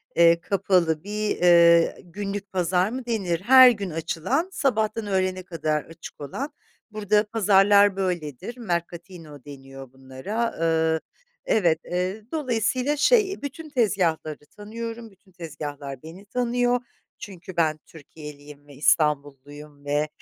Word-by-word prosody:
eee, 170 0 +5
kapalı 180 -4 +1
bir, 210 +1 -3
eee, 170 -1 +5
günlük 200 +2 -6
pazar 180 +1 +1
mı 250 +1 -6
denir. 190 -8 -2
Her 255 +3 +8
gün 205 -5 -2
açılan, 165 - -2
sabahtan 220 -7 -1
öğlene 185 -1 -1
kadar 155 -4 -2
açık 165 -2 -13
olan; 270 - -5 0.4
burada 210 0 +1
pazarlar 205 -2 +4
böyledir. 180 - -4
Mercatino 170 - -6
deniyor 135 -2 -12
bunlara. 135 - -4
Iıı, 160 -1 +1 0.5
evet, 170 -7 +2
eee 185 +4 -3
dolayısıyla 255 -1 -1
şey, 395 - +2
bütün 305 +3 -7
tezgahları 180 - -1
tanıyorum, 225 +1 -7
bütün 190 0 -26
tezgahlar 145 -5 -8
beni 170 +5 -12
tanıyor 245 +2 0 0.4
çünkü 185 -3 -10
ben 155 -2 +1
Türkiyeliyim 145 -2 -13
ve 145 - -14
İstanbulluyum 145 0 -1
ve 145 +1 0
185 Hz, 120 wpm, -24 LUFS, 155-215 Hz, 0.5 s, Her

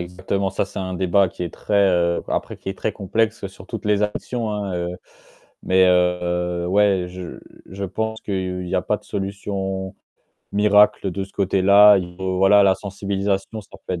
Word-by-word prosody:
exactement, 95 +2 -3
ça 95 - -1
c'est 95 - -9
un 95 -1 -4
débat 95 +2 +2
qui 90 - -8
est 85 - -4
très, 105 - -4 0.2
heu, 85 -1 +1
après - - -3
qui - - -9
est 95 - -5
très 110 - -2
complexe 105 +2 -1
sur 95 -1 -15
toutes 110 +1 -7
les 105 0 +2
actions, 110 +2 -3
hein, 100 -2 -3
heu, 85 0 -2 0.8
mais 95 0 +4
heu, 90 -1 +1
ouais, 100 -1 +2
je 90 -1 -8 0.3
je 100 +1 -6
pense 110 +4 -3
qu'il 90 -2 -3
y - - -3
a - - +1
pas - - 0
de - - -26
solution 95 -1 -4 0.6
miracle 105 -1 +4
de 95 +2 -4
ce 95 - -18
côté-là, 100 +1 +5
il 90 -1 -6
faut, 95 0 -2
voilà 100 +2 +6
la 95 -1 +4
sensibilisation, 100 +1 -3
ça 105 - -20 0.2
peut - - -3
être 90 - -4
95 Hz, 190 wpm, -21 LUFS, 90-100 Hz, 0.8 s, voilà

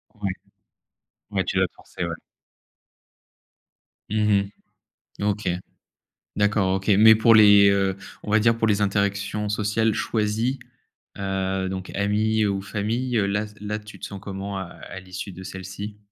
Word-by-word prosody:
Ouais. 100 -3 -2 1.0
Ouais 95 -2 0
tu 95 - -1
vas 95 - +4
te - - -25
forcer, 90 - -7
ouais. 85 -1 -3 2.0
Mmh 105 -2 +2 0.7
mh. - - -1
OK. 105 -1 0 0.9
D'accord, 105 -2 +2
OK, 95 +2 -5
mais 110 +1 +9
pour 115 +1 +5
les, 105 -2 +8
heu, 95 -1 +1 0.3
on 105 - -4
va 110 - +5
dire 115 +1 +3
pour 115 - +1
les 105 -1 +2
interactions 100 +1 0
sociales 105 +1 +1
choisies, 110 +4 -1 0.6
heu, 95 -1 -1
donc 95 -1 -5
amis 105 +2 +1
ou 100 -1 -1
famille, 115 +5 -2
heu, 100 - +2
là 105 +1 0
s 105 - -10
là 105 +1 -3
tu 105 0 -13
te - - -6
sens 100 - -7
comment 100 0 -5
à 95 - -3 0.3
à - - -7
l'issue 95 +1 -7
de 95 +2 -9
celles-ci? 95 +3 -7
100 Hz, 155 wpm, -24 LUFS, 95-105 Hz, 2.0 s, mais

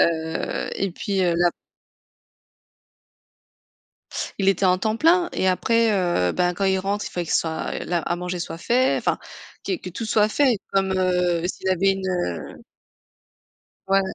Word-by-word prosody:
Heu, 160 -1 0
et 195 - -1
puis, 195 +2 -2
heu, 175 -2 +2
là 175 0 +3 2.9
Il 195 0 +2
était 195 0 +2
en 180 0 +3
temps 215 +3 0
plein 345 +5 +4
et 190 - +1
après, 230 +4 +2
heu, 175 - +1
bah 180 0 +1
quand 195 - -2
il 190 0 +2
rentre, 200 +2 -2
il - - -6
fallait 175 -1 -3
qu'il - - -1
soit 160 -1 -1
la 175 -1 0
à 175 - -2
manger 180 0 -4
soit 165 - -5
fait, 250 +8 +2
enfin - - 0 0.5
que - - 0
que 185 - -8
tout 225 +6 -5
soit 215 0 +3
fait 255 -2 +2
comme, 195 -1 +1
heu, 180 -2 +1
s'il 190 - -4
avait 190 +1 +3
une, 190 0 -4
heu 90 - -3 1.3
Ouais. 195 0 +4
185 Hz, 165 wpm, -23 LUFS, 175-200 Hz, 2.9 s, plein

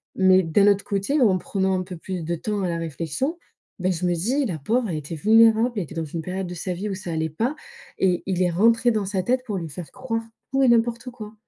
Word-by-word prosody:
Mais, 190 0 +5
d'un 195 +5 +3
autre 200 -1 +3
côté, 205 +9 0
en 195 -6 +4
prenant 190 0 0
un - - -2
peu 180 -1 -8
plus 180 +1 -5
de 170 +2 -2
temps 205 +5 -3
à 180 - 0
la 170 - -1
réflexion, 165 - -3 0.4
mais 185 +1 +1
je 180 0 -2
me 175 - +2
dis: 250 - 0
«La 175 -6 -3
pauvre, 225 - 0
elle 170 - -2
était 150 +2 -6
vulnérable, 225 +6 +5
elle 200 - 0
était 165 - -11
dans 165 -1 -2
une 160 +2 -5
période 185 +2 -4
de 175 - -6
sa 180 +2 -3
vie 195 +4 -4
où 195 - -3
ça 185 -2 -6
allait 160 0 -1
pas». 230 - -1 0.4
Et 180 -2 +2
il 185 -2 0
est 180 - +2
rentré 230 +6 +4
dans 215 -3 -1
sa 190 -1 -1
tête 255 +4 +1
pour 210 -5 -3
lui 165 -3 -5
faire 160 +3 -8
croire 230 -3 -3 0.3
tout 270 0 +3
et - - +5
n'importe 235 +1 +2
quoi. 215 -3 -9
190 Hz, 260 wpm, -24 LUFS, 175-225 Hz, 0.4 s, Mais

